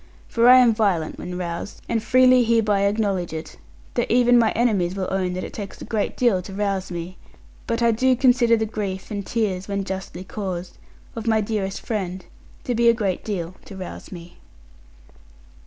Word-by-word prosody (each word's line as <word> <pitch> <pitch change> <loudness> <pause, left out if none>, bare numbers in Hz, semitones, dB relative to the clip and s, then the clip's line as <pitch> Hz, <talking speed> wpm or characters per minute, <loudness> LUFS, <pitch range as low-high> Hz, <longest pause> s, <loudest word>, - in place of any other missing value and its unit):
For 235 +1 +4
I 255 - +10
am 245 -3 +6
violent 195 -8 0
when 180 0 -5
roused; 170 +2 -5
and 230 -1 0
freely 255 +1 +5
hereby 210 -4 +2
acknowledge 200 -5 -1
it; 160 0 -7 0.4
though - - 0
even 245 0 +5
my 225 -2 +4
enemies 200 -7 +1
will 190 -1 -2
own 185 -1 -1
that 185 - -4
it - - -7
takes 200 -2 -7
a - - -8
great 215 -3 -2
deal 235 -7 +3
to 190 +2 -10
rouse 195 -2 -1
me. 175 +1 -6 0.5
But 230 0 0
I 235 - +5
do 255 +3 +3
consider 245 -2 +4
the 220 - 0
grief 200 -3 -5
and 205 -1 -3
tears 195 -4 -2
(when 200 -1 -2
justly 190 -1 -6
caused) 185 -3 -6 0.4
of 230 0 -6
my 220 -1 +3
dearest 205 -2 -2
friends, 190 -4 -4 0.4
to 245 - -1
be 235 0 +4
a 235 - +4
great 200 -5 -2
deal 180 -5 -4
to 195 - -10
rouse 185 -1 -8
me. 175 -2 -11
205 Hz, 190 wpm, -23 LUFS, 185-230 Hz, 0.5 s, I